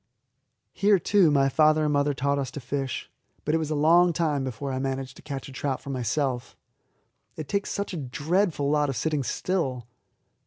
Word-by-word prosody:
Here, 200 +2 +4
too, 190 -1 +4
my 140 -2 +3
father 155 +3 +4
and 150 -1 +1
mother 145 0 +1
taught 140 +2 0
us 135 -2 -2
to - - -5
fish; 135 0 -3 0.4
but 150 - 0
it 165 - +3
was 155 -2 -3
a 155 - -1
long 170 +4 +5
time 150 -4 0
before 130 +2 -4
I 130 - -2
managed 135 -1 -3
to - - -13
catch 140 -3 -6
a - - -10
trout 135 0 -2
for 140 - -7
myself. 125 0 -2 0.8
It 155 -3 -6
takes 200 +7 -1
such 200 -1 -3
a - - -3
dreadful 150 +3 0
lot 150 -1 +2
of 135 - -2
sitting 150 +5 0
still. 130 -4 -2
145 Hz, 195 wpm, -26 LUFS, 135-160 Hz, 0.8 s, long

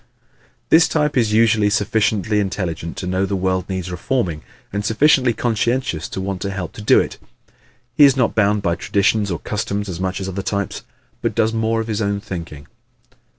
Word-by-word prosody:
This 160 +1 +6
type 150 -1 0
is 115 -4 +2
usually 110 -1 +4
sufficiently 105 -1 +1
intelligent 90 -5 -3
to - - -4
know 95 +1 0
the 100 - -1
world 95 0 -1
needs 95 -1 -3
reforming 90 -3 -2 0.3
and 100 0 -2
sufficiently 130 +3 +3
conscientious 115 -5 -1
to - - -5
want 95 -1 -4
to 100 - -2
help 95 -3 -5
to - - -9
do 105 - +5
it. - - -3 0.7
He 145 - +5
is 135 -2 +6
not 125 -3 +2
bound 105 -1 +2
by 85 - +1
traditions 100 +3 +1
or 85 - -1
customs 105 0 -3
as 90 -3 -5
much 95 +1 -2
as 95 - -4
other 95 +1 -3
types 100 0 -3 0.4
but - - -1
does 110 +1 +2
more 115 0 0
of 110 - -6
his 110 -1 -2
own 100 -1 0
thinking. 85 -7 -7
100 Hz, 190 wpm, -20 LUFS, 95-115 Hz, 0.7 s, This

